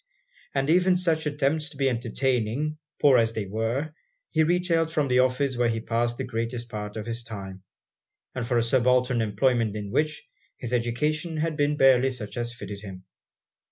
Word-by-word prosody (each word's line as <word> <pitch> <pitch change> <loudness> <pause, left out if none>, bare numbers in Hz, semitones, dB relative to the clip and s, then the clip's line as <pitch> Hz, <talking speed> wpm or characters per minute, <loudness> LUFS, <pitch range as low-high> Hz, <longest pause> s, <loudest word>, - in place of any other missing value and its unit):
And 135 0 +1
even 180 +1 +4
such 165 -4 0
attempts 150 +1 0
to 145 - -14
be 135 0 +2
entertaining, 125 +4 -1 0.2
poor 135 -4 +6
as 115 -1 +1
they 110 -3 -3
were, 115 +9 -2 0.4
he 160 - +2
retailed 165 0 +2
from 150 -3 +1
the 125 0 +4
office 130 +1 +2
where 120 0 +2
he 115 0 -1
passed 120 +1 -1
the - - -3
greatest 115 +1 -3
part 105 -1 -6
of 110 - -5
his 115 0 -3
time, 100 -4 -8 0.7
and 130 - -3
for 120 +1 0
a 115 - +3
subaltern 125 0 +2
employment 110 +1 +1
in 100 -2 -5
which, 155 +3 -1 0.3
his 125 0 -5
education 150 +8 -1
had 160 0 -1
been 145 0 +1
barely 135 -2 +5
such 120 -6 -6
as 120 -1 -2
fitted 100 -4 -8
him. 95 -3 -9
125 Hz, 180 wpm, -26 LUFS, 115-150 Hz, 0.7 s, poor